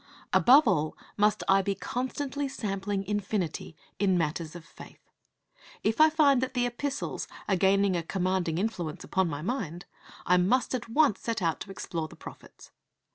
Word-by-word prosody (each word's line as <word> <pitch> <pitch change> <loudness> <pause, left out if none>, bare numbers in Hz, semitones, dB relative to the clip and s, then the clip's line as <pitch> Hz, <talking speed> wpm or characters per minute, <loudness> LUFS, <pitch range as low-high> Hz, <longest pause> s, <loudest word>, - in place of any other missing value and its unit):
Above 270 +3 +6
all 155 -6 +1 0.2
must 210 0 +2
I 195 0 +5
be 195 +1 -1
constantly 270 +6 -3
sampling 200 -5 -3
infinity 195 -5 -2 0.2
in 190 -3 +3
matters 165 0 -2
of 170 -2 -10
faith. - - -13 0.9
If 225 +7 +2
I 315 - +8
find 290 -4 +4
that 260 0 -3
the 245 0 +2
Epistles 270 +4 -3 0.2
are 195 - +2
gaining 195 +1 +3
a 170 - 0
commanding 180 -1 -1
influence 180 -6 -3
upon 190 -2 0
my 145 0 -5
mind, 180 - -3 0.4
I 180 - +4
must 225 +11 +2
at 240 -2 -3
once 275 -3 +3
set 230 -1 -2
out 165 -1 0
to - - -8
explore 170 -4 -4
the - - -14
prophets. - - -13
195 Hz, 165 wpm, -28 LUFS, 175-245 Hz, 0.9 s, I